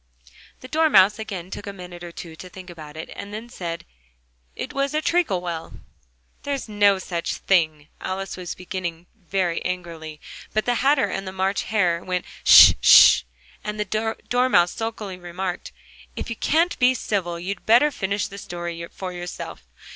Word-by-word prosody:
The 255 - -9
Dormouse 220 -10 +4
again 190 -5 -6
took 205 - -7
a - - -3
minute 180 -2 -10
or 175 - -7
two 170 -1 -9
to 185 +3 -10
think 185 0 -11
about 155 -2 -11
it, 160 - -7
and 200 - -8
then 220 +3 -7
said: 170 -7 -6 0.7
"It - - -6
was 275 +1 -1
a 310 - +1
treacle 315 - +1
well." 165 -2 -5 0.7
"There's 280 -3 -3
no 205 -2 +3
such 175 -2 -3
thing!" 155 -5 +1
Alice 195 +1 -4
was 180 -2 -6
beginning 180 -2 -5
very 185 -3 -2
angrily, 165 -4 -5 0.4
but 215 - +1
the 245 -1 +1
Hatter 275 +1 +4
and 195 0 -4
the - - -4
March 190 +1 -1
Hare 180 -6 +1
went 180 -1 -2 0.2
"Sh! - - +10
Sh!" - - +8 0.4
and 210 0 -5
the 210 - 0 0.4
Dormouse 245 -8 +3
sulkily 215 -4 -5
remarked: 175 +1 -5 0.4
"If - - -5
you - - -3
can't 330 +9 +1
be 255 0 +4
civil, 185 -7 -2
you'd 185 +2 -5
better 245 +7 +5
finish 200 -4 -2
the 200 - -9
story 175 -2 -6
for 185 -1 -7
yourself." 175 - -7
190 Hz, 170 wpm, -23 LUFS, 175-215 Hz, 0.7 s, Sh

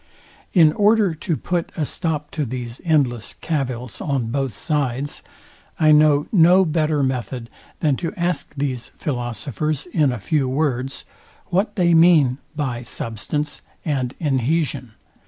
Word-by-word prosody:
In 160 -4 +6
order 210 -2 +3
to 160 0 -2
put 175 -2 -2
a 155 - 0
stop 150 -1 -2
to 155 - -2
these 125 -1 -5
endless 135 -9 +1
cavils 130 -6 -3
on 130 -6 -1
both 135 -4 -2
sides, 145 -3 -1 0.6
I 155 -1 +5
know 150 -1 +5
no 185 0 +6
better 155 -2 +1
method, 125 -2 -3 0.3
than 145 -5 +2
to 170 - -3
ask 175 -4 -1
these 135 -4 -2
philosophers 140 +3 -3
in 155 -6 +1
a 125 - -3
few 135 +5 0
words, 135 -2 -1 0.4
What 190 +4 0
they 175 -4 +3
mean 160 -6 +5 0.2
by 130 -6 -2
substance 125 +6 -4 0.2
and 135 -5 -1
inhesion? 140 -3 0
145 Hz, 135 wpm, -21 LUFS, 130-160 Hz, 0.6 s, In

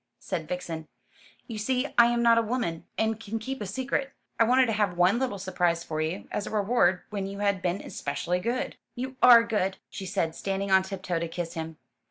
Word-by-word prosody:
said 170 -5 -4
Vixen. 165 -3 -5 0.6
"You 225 -4 -6
see 255 +5 -1
I 235 0 +7
am 235 0 +1
not 230 -1 +6
a - - +3
woman, 220 -8 -2
and 220 0 0
can 225 0 -4
keep 260 +3 -5
a 205 - -3
secret. 265 +6 -2 0.3
I - - +7
wanted 255 +3 +5
to 230 - -1
have 205 -4 0
one 185 +6 +4
little 255 -6 -1
surprise 175 -3 0
for 155 -2 -3
you, 160 +5 -3
as 205 - -2
a - - -3
reward 200 -4 +2
when 200 -2 -2
you 200 0 -6
had 200 -2 +1
been 180 +2 0
especially 145 +5 -2
good. 235 +7 -2 0.2
"You 260 +2 -5
are 235 -2 +9
good," 195 -4 -1
she 190 - -6
said, 175 -4 -1
standing 195 +2 -2
on 190 0 +7
tiptoe 185 -3 -3
to 170 - -2
kiss 165 0 -5
him. 160 -2 -5
200 Hz, 215 wpm, -27 LUFS, 175-230 Hz, 0.6 s, are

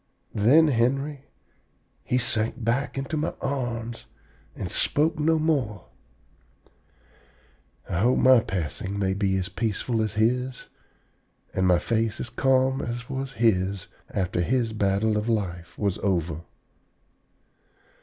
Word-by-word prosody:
Then, 145 +10 +5
Henry, 135 +3 0 0.8
he 125 - 0
sank 115 0 0
back 125 +5 0
into 135 +4 -3
my 150 - -2
arms 120 -4 -3 0.5
and - - -4
spoke 155 +2 +1
no 160 +2 +3
more. 135 - -1 2.0
I 85 - -2
hope 120 +5 +3
my 130 -1 +7
passing 95 0 -4
may 95 -1 +1
be 95 -1 +1
as 90 -1 -2
peaceful 110 +3 -1
as 110 -1 -2
his, 125 +4 0 0.8
and 95 0 +1
my 90 -1 +5
face 115 +3 -1
as 120 - -5
calm 130 0 +2
as 120 +2 -5
was 135 0 -4
his 100 -5 +1 0.2
after 90 -2 -1
his 115 +3 0
battle 105 +1 +1
of 105 +3 -3
life 90 -6 -2
was 100 -3 -1
over. 85 -5 -1
115 Hz, 125 wpm, -26 LUFS, 100-130 Hz, 2.0 s, my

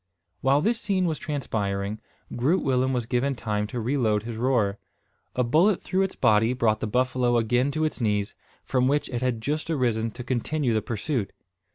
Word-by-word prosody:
While 135 +2 +3
this 230 +5 +1
scene 190 -3 +1
was 160 -3 -1
transpiring, 105 -7 -2 0.4
Groot 145 +10 +2
Willem 130 -1 +1
was 125 -3 -1
given 130 +3 0
time 105 -3 -2
to 120 - -4
reload 110 -4 +1
his 115 0 -5
roer. 110 -4 +1 0.6
A 125 - +2
bullet 165 - +3
through 190 +1 0
its 190 -1 -1
body 110 +2 +3
brought 110 -4 +1
the 110 - -2
buffalo 125 +1 +1
again 120 +4 +2
to 155 +2 -1
its 155 - -3
knees, 105 -2 0 0.3
from 130 -1 +1
which 145 +1 +1
it 120 -2 -3
had 125 -3 -1
just 150 +6 -2
arisen 120 -7 0
to 125 +3 -8
continue 130 +1 -1
the 110 - +1
pursuit. 115 0 -2
125 Hz, 185 wpm, -26 LUFS, 110-140 Hz, 0.6 s, While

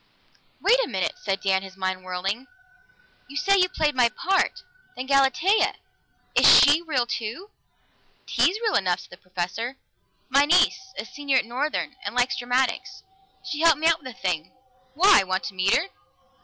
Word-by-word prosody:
"Wait - - +4
a - - -3
minute!" - - -2
said 195 - -2
Dan, 190 -1 +1
his 190 -1 -12
mind 185 -1 -3
whirling. 195 +7 -4 0.8
"You 285 - -8
say 395 +4 +2
you 365 0 +3
played 305 -4 0
my 250 -3 +3
part. 380 - -1 0.3
Then 255 - -6
Galatea 275 - +2 0.6
is - - +5
she 290 +3 +5
real 275 -8 -1
too?" 240 - -6 0.7
"Tea's 370 +4 +1
real 435 - 0
enough," 180 -2 0
said - - -17
the 175 - -12
Professor. 185 +9 -5 0.5
"My 275 +2 +3
niece, 350 +4 +3 0.2
a - - -5
senior 280 +1 -1
at 250 - +1
Northern, 265 +6 -3
and - - -6
likes 250 +1 +1
dramatics. 255 +10 -2 0.4
She 370 -6 -5
helped 330 -2 +4
me 315 - -4
out 330 -1 +3
with 260 - -10
the 250 - -18
thing. 175 -7 -3 0.4
Why? 380 - +5
Want 185 0 -2
to 200 - -6
meet 185 +1 +2
her?" 345 +6 -1
260 Hz, 170 wpm, -24 LUFS, -, 0.8 s, is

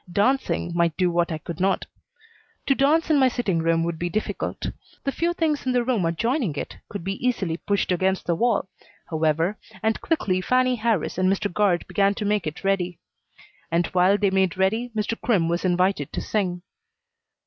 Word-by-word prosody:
Dancing 210 -3 +1
might 170 -2 +1
do 180 -2 +2
what 170 0 +1
I 160 - -1
could 165 +2 -8
not. 190 +1 +1 0.8
To 275 - +4
dance 300 +5 +2
in 295 - +5
my 260 - +5
sitting 235 -9 0
room 165 0 +2
would 165 -1 -3
be 175 - -1
difficult. 215 +5 -3 0.3
The 275 - 0
few 335 +4 0
things 320 -4 0
in 255 - +2
the 245 -1 +2
room 235 -7 +1
adjoining 225 - 0
it - - -5
could 200 -5 -6
be 195 +4 -4
easily 195 -10 0
pushed 200 +1 -1
against 190 +1 +1
the 170 - +1
wall, 220 +1 +1 0.4
however, 160 +5 +1 0.2
and 220 0 +1
quickly 190 - 0
Fannie 255 +4 +2
Harris 220 -6 0
and 185 +1 +3
Mr. 200 0 -1
Guard 195 -4 +2
began 200 0 +2
to 210 - -3
make 205 -5 0
it 155 - -6
ready. 180 -3 0 0.7
And 170 +1 +2
while 185 +2 +4
they 200 -2 +1
made 190 -1 +1
ready, 220 +6 +1
Mr. 215 +1 -2
Crimm 195 -9 +2
was 170 +1 -1
invited 180 -4 +1
to - - -2
sing. 180 -4 -2
195 Hz, 190 wpm, -24 LUFS, 175-230 Hz, 0.8 s, in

